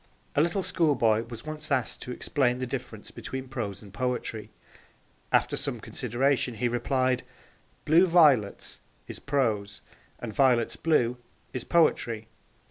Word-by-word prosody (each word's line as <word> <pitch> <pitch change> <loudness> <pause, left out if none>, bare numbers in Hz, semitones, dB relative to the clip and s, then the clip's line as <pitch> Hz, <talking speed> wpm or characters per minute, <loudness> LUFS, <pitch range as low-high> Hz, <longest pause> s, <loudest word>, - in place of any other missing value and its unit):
A 145 - +4
little 170 +4 +1
schoolboy 120 -12 +2
was 115 +1 -8
once 155 -1 -6
asked 130 -4 0
to 125 - -6
explain 125 -1 0
the 130 - -2
difference 120 -4 -6
between 130 0 -6
prose 110 -6 -5
and 100 -2 -14
poetry. 125 -3 -3 0.8
After - - +2
some - - -1
consideration 125 0 0
he 120 +3 0
replied, 130 +1 +1 0.6
'"blue 170 +5 +5
violets" 150 - +3 0.3
is - - -8
prose, 110 -8 -1 0.4
and 115 -3 -6
"violets 125 -3 +3
blue" 125 -7 +1 0.4
is 125 - -3
poetry.' 120 -9 +2
125 Hz, 130 wpm, -27 LUFS, 115-145 Hz, 0.8 s, blue